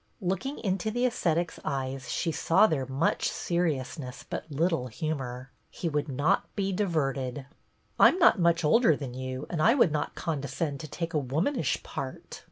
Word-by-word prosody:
Looking 210 +9 -2
into 195 0 -1
the 245 +3 0
ascetic's 175 -8 0
eyes 135 -2 -3
she 165 - 0
saw 165 +5 +4
there 140 -9 0
much 135 +5 +1
seriousness 150 -6 -2
but 160 - -6
little 160 -3 +1
humor. 130 -2 -4 0.2
He 170 - -3
would 150 -1 -1
not 145 +9 +1
be 195 -1 0
diverted. 140 -8 -1 0.3
" - - -42
I - - +10
'm - - +2
not 340 - +5
much 170 -1 +3
older 195 0 +5
than 135 -4 -6
you 130 +2 -5
and 165 -3 -1
I 230 +9 +5
would 235 - +4
not 150 -1 -2
condescend 145 -1 -3
to 155 - -7
take 165 +3 -4
a 150 - +2
womanish 150 - 0
part." - - -6
155 Hz, 175 wpm, -28 LUFS, 135-180 Hz, 0.3 s, I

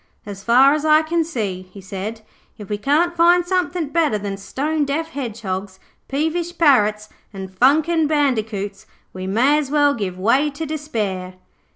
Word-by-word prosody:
'As 200 -1 -8
far 255 +5 +5
as 300 -1 -1
I 310 0 +4
can 330 +1 0
see,' 215 - -4
he 200 - -12
said, 195 +4 -6 0.4
'if 205 -3 -10
we 210 - -2
can't 320 +8 +1
find 345 +1 +4
somethin' 360 -3 -1
better 310 -9 +1
than 200 -1 -4
stone 295 +10 -2
deaf 300 +3 -2
hedgehogs, 205 -8 -5 0.3
peevish 325 +5 -2
parrots, 215 -9 +3 0.2
and 190 -2 -8
funkin' 310 - +3
bandicoots 220 -9 -1 0.3
we 185 0 -6
may 255 +10 +3
as 285 -3 -4
well 290 -1 +3
give 195 -7 -4
way 255 +10 +2
to 295 +3 -6
despair.' 215 -12 -4
270 Hz, 160 wpm, -20 LUFS, 205-310 Hz, 0.4 s, far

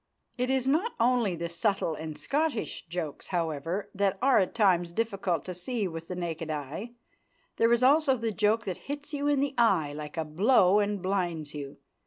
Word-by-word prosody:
It 250 +1 -1
is 265 -1 +1
not 335 - +1
only 230 -5 +2
the 170 +1 -3
subtle 170 0 0
and 155 -1 -6
Scottish 275 - -2
jokes, 165 -3 -5
however, 170 +3 -2
that 195 0 +1
are 265 +1 +4
at 190 - 0
times 180 -6 +3
difficult 195 -5 -1
to 185 - -4
see 205 +4 -2
with 165 -1 -7
the 180 - -5
naked 165 -2 -4
eye. 155 - -5 0.6
There 230 +1 +4
is 235 +1 +3
also 275 0 +5
the 225 -1 -2
joke 215 +2 +1
that 185 -3 -3
hits 290 +1 -5
you 290 0 -1
in 290 -2 +3
the 280 -1 0
eye 180 -11 +3
like 150 +1 -7
a 160 - -1
blow 190 +4 +4
and 205 -2 -1
blinds 175 -6 -1
you. 140 -2 -7
195 Hz, 190 wpm, -28 LUFS, 165-240 Hz, 0.6 s, also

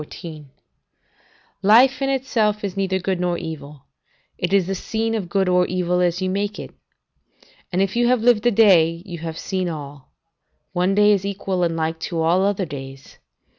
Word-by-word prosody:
] - - -37
"Life 240 +7 +5
in 270 - 0
itself 225 -6 0
is 200 -2 -3
neither 190 -1 0
good 185 0 -2
nor 175 -1 0
evil; 150 -4 -8 0.5
it 175 - -3
is 195 -2 +3
the 195 - -2
scene 225 +4 -2
of 200 -6 -3
good 195 0 +1
or 180 0 +3
evil 180 0 0
as 180 +1 0
you - - 0
make 205 +2 -2
it.' - - -9 1.0
And, 185 +1 +2
if 195 +2 -3
you 240 0 +2
have 245 -2 +2
lived 240 -1 +4
a - - +4
day, 175 -6 +4
you 175 -4 -7
have 165 0 -6
seen 185 0 -2
all: 145 -4 -8 0.6
one 180 +2 +1
day 210 0 +5
is 200 -2 +2
equal 195 -2 -3
and 170 -1 0
like 160 0 -2
to 165 0 -4
all 165 +3 +2
other 200 -1 0
days. 135 -3 -10
185 Hz, 185 wpm, -21 LUFS, 170-205 Hz, 1.0 s, Life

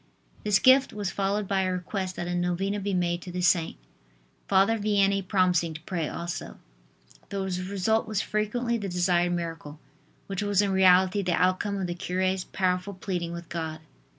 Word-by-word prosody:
This 210 -2 +4
gift 260 +4 +5
was 205 -2 -3
followed 200 +1 -1
by 195 -1 +1
a 185 -1 0
request 185 +1 -3
that 175 - -4
a 175 - -2
novena 180 +3 -1
be 200 -1 -2
made 175 -1 0
to 180 - -8
the 180 +1 -3
saint, 170 -2 +2 0.7
Father 200 +4 +3
Vianney 200 -1 +2
promising 180 -4 +2
to 155 - -8
pray 165 -2 -3
also. 170 0 -5 0.7
The 200 -1 -3
result 190 +4 -1
was 215 -2 -1
frequently 235 +3 -1
the 200 -2 -4
desired 175 0 +2
miracle, 165 -3 -5 0.5
which 195 -1 -4
was 205 -2 +1
in 205 -1 +3
reality 190 +1 +5
the 180 -2 0
outcome 185 +3 +1
of 190 - -2
the 175 - -3
cure's 185 +1 -1
powerful 185 +1 -1
pleading 180 -3 -3
with 170 -1 -7
God. 160 -2 -4
185 Hz, 175 wpm, -27 LUFS, 175-200 Hz, 0.7 s, gift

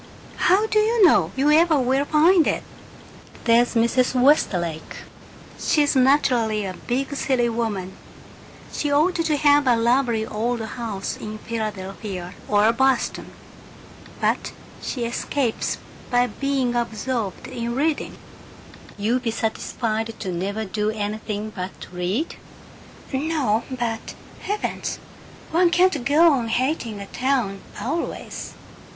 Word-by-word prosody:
"How 385 +4 +4
do 435 -1 +2
you 440 -1 +4
know 330 - +4
you 280 +3 +3
ever 320 0 +5
will 265 +2 +1
find 320 +3 +4
it?" - - 0 0.8
"There's 240 +1 +3
Mrs. 250 +2 +2
Westlake. 175 - +2 0.6
She's 290 -2 +2
naturally 250 -5 +3
a 185 - -4
big 265 +8 -3
city 250 -3 +1
woman 210 -5 -3 0.8
she 295 - -1
ought 310 +6 +3
to 310 -2 +1
have 290 -1 +4
a 245 - +5
lovely 235 -1 +2
old 230 +3 -2
house 220 -3 -4
in 215 0 -6
Philadelphia 195 -4 -5
or 210 +2 +4
Boston 265 0 +1 0.9
but - - 0 0.3
she 245 -3 -3
escapes 235 +1 -1 0.3
by 245 -1 +3
being 270 -1 -1
absorbed 235 -2 -2
in 235 -2 -4
reading." 295 +3 -1 0.8
"You 225 +5 +1
be 245 -2 -2
satisfied 225 0 -2
to 190 - -4
never 200 +5 -3
do 210 +2 -1
anything 215 0 -3
but 185 0 -6
read?" 185 - -2 0.8
"No, 265 -6 0
but 235 -3 -4 0.3
Heavens, 415 +1 -3 0.5
one 345 +2 +4
can't 345 -5 +3
go 315 +4 +6
on 245 -4 0
hating 235 -3 -1
a 200 - -6
town 245 -5 -1 0.2
always!" 275 +11 -4
240 Hz, 120 wpm, -23 LUFS, 215-285 Hz, 0.9 s, go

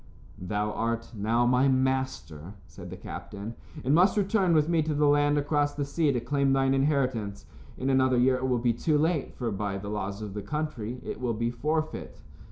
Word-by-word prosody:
"Thou 105 +3 -1
art 115 +2 -2
now 115 +4 +1
my 125 +2 +3
master," 130 - -1
said - - -11
the - - -8
captain, 105 +3 -7 0.3
"and 135 - +3
must 180 +6 +4
return 195 -3 +2
with 150 -1 +3
me 165 -1 +2
to 155 -1 -1
the 150 +1 +3
land 145 0 +3
across 145 0 +1
the 145 - -2
sea 150 +1 +1
to 125 - 0
claim 140 +2 +1
thine 135 0 +2
inheritance. 130 -7 0 0.3
In 130 - -3
another 130 -1 +3
year 130 +1 +4
it 130 +1 -2
will 125 -1 +2
be 120 0 +1
too 150 +6 +1
late, 160 -1 0
for 120 -3 -3
by 100 -1 -2
the 100 +1 -6
laws 100 -1 -3
of 105 -2 -6
the 105 - -4
country 125 -2 -4
it - - -6
will 120 -3 -1
be 115 +2 -1
forfeit." 155 +6 -3
130 Hz, 200 wpm, -28 LUFS, 115-145 Hz, 0.3 s, must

